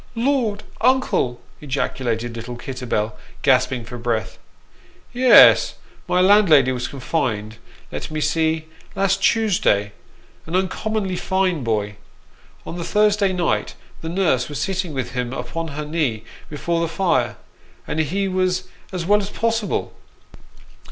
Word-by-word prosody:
" -, -, -29 dB
Lord, 230 Hz, -4 st, 0 dB, 0.2 s
uncle! 240 Hz, -, +2 dB
" -, -, -30 dB
ejaculated 120 Hz, -4 st, -2 dB
little 120 Hz, +1 st, -6 dB
Kitterbell, 120 Hz, -4 st, -3 dB, 0.3 s
gasping 130 Hz, -3 st, +2 dB
for 120 Hz, +1 st, -8 dB
breath. 115 Hz, -2 st, -2 dB, 0.4 s
" -, -, -28 dB, 0.3 s
Yes; 250 Hz, 0 st, +7 dB, 0.3 s
my 180 Hz, -, +2 dB
landlady 180 Hz, -9 st, +5 dB
was 125 Hz, -1 st, -2 dB
confined 120 Hz, -6 st, -2 dB, 0.3 s
let -, -, -5 dB
me 155 Hz, -, -3 dB
see 160 Hz, +1 st, 0 dB, 0.3 s
last 195 Hz, 0 st, +1 dB
Tuesday: 180 Hz, -, +2 dB, 0.6 s
an 165 Hz, -, -3 dB
uncommonly 190 Hz, +1 st, -1 dB
fine 185 Hz, -6 st, 0 dB
boy. 105 Hz, -3 st, -1 dB, 0.7 s
On 175 Hz, -, -6 dB
the -, -, -3 dB
Thursday 210 Hz, 0 st, +2 dB
night 180 Hz, -2 st, -1 dB, 0.3 s
the 160 Hz, -, -5 dB
nurse 165 Hz, -9 st, +1 dB
was 145 Hz, -2 st, -5 dB
sitting 185 Hz, +2 st, -2 dB
with 130 Hz, -2 st, -3 dB
him 125 Hz, 0 st, -3 dB
upon 135 Hz, +7 st, -4 dB
her 150 Hz, 0 st, -5 dB
knee 150 Hz, -8 st, -1 dB, 0.3 s
before 165 Hz, +3 st, -2 dB
the 170 Hz, -, 0 dB
fire, 170 Hz, +3 st, 0 dB, 0.5 s
and 155 Hz, -, -3 dB
he 190 Hz, +6 st, 0 dB
was 185 Hz, -1 st, 0 dB, 0.3 s
as 180 Hz, -3 st, -3 dB
well 205 Hz, +3 st, +4 dB
as 200 Hz, -, -5 dB
possible. 225 Hz, -1 st, -1 dB
160 Hz, 140 wpm, -21 LUFS, 125-195 Hz, 0.7 s, Yes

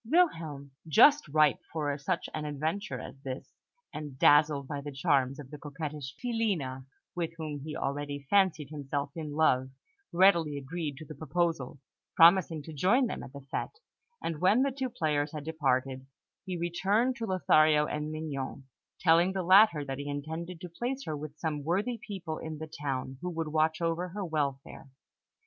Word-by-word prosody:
Wilhelm, 165 Hz, -, +1 dB, 0.2 s
just 290 Hz, -, +6 dB
ripe 150 Hz, 0 st, +3 dB
for 145 Hz, -3 st, -1 dB
such 170 Hz, +5 st, -2 dB
an 155 Hz, -, -3 dB
adventure 155 Hz, +7 st, -3 dB
as 135 Hz, -, -10 dB
this, 130 Hz, -1 st, -7 dB, 0.4 s
and 150 Hz, -3 st, -7 dB
dazzled 145 Hz, -1 st, +5 dB
by 145 Hz, -1 st, -4 dB
the 145 Hz, +1 st, -6 dB
charms 135 Hz, -2 st, +1 dB
of 140 Hz, -1 st, -10 dB
the 150 Hz, -, -8 dB
coquettish 145 Hz, -1 st, -6 dB
Filina, 190 Hz, -, -2 dB, 0.3 s
with 165 Hz, -2 st, -2 dB
whom 155 Hz, -3 st, -4 dB
he 150 Hz, +2 st, -6 dB
already 145 Hz, 0 st, -3 dB
fancied 180 Hz, -7 st, +2 dB
himself 145 Hz, -1 st, -3 dB
in 155 Hz, -3 st, -5 dB
love, 130 Hz, -4 st, +3 dB, 0.4 s
readily 170 Hz, -5 st, +4 dB
agreed 145 Hz, +1 st, -4 dB
to 155 Hz, -, -9 dB
the 155 Hz, -, -9 dB
proposal, 160 Hz, -2 st, -2 dB, 0.4 s
promising 165 Hz, -2 st, +6 dB
to 160 Hz, -, -9 dB
join 200 Hz, -, +3 dB
them -, -, -4 dB
at -, -, -9 dB
the 140 Hz, -1 st, -11 dB
fête; -, -, -3 dB, 0.5 s
and 160 Hz, -2 st, -3 dB
when 205 Hz, +8 st, +5 dB
the 275 Hz, -, +1 dB
two 260 Hz, 0 st, -3 dB
players 150 Hz, -9 st, -1 dB
had 150 Hz, -2 st, -5 dB
departed, 135 Hz, -4 st, -1 dB, 0.4 s
he 185 Hz, -2 st, -3 dB
returned 195 Hz, +9 st, +1 dB
to 230 Hz, -1 st, -4 dB
Lothario 155 Hz, -5 st, +4 dB
and 150 Hz, +1 st, -3 dB
Mignon, 145 Hz, -4 st, -5 dB, 0.4 s
telling 175 Hz, +2 st, +4 dB
the 190 Hz, -1 st, -2 dB
latter 185 Hz, -4 st, +6 dB
that 135 Hz, 0 st, -4 dB
he 145 Hz, 0 st, -5 dB
intended 160 Hz, +5 st, -5 dB
to 180 Hz, -, -6 dB
place 245 Hz, +10 st, -4 dB
her 155 Hz, -, -3 dB
with 150 Hz, 0 st, -8 dB
some 150 Hz, -3 st, -3 dB
worthy 205 Hz, -, -1 dB
people 180 Hz, -6 st, -6 dB
in 160 Hz, -1 st, -6 dB
the 160 Hz, -, -5 dB
town, 135 Hz, -4 st, -4 dB
who 180 Hz, -, -3 dB
would 165 Hz, -2 st, -3 dB
watch 155 Hz, +1 st, +1 dB
over 170 Hz, +1 st, -1 dB
her 195 Hz, +2 st, -4 dB
welfare. 140 Hz, -4 st, -3 dB
155 Hz, 170 wpm, -30 LUFS, 145-175 Hz, 0.5 s, just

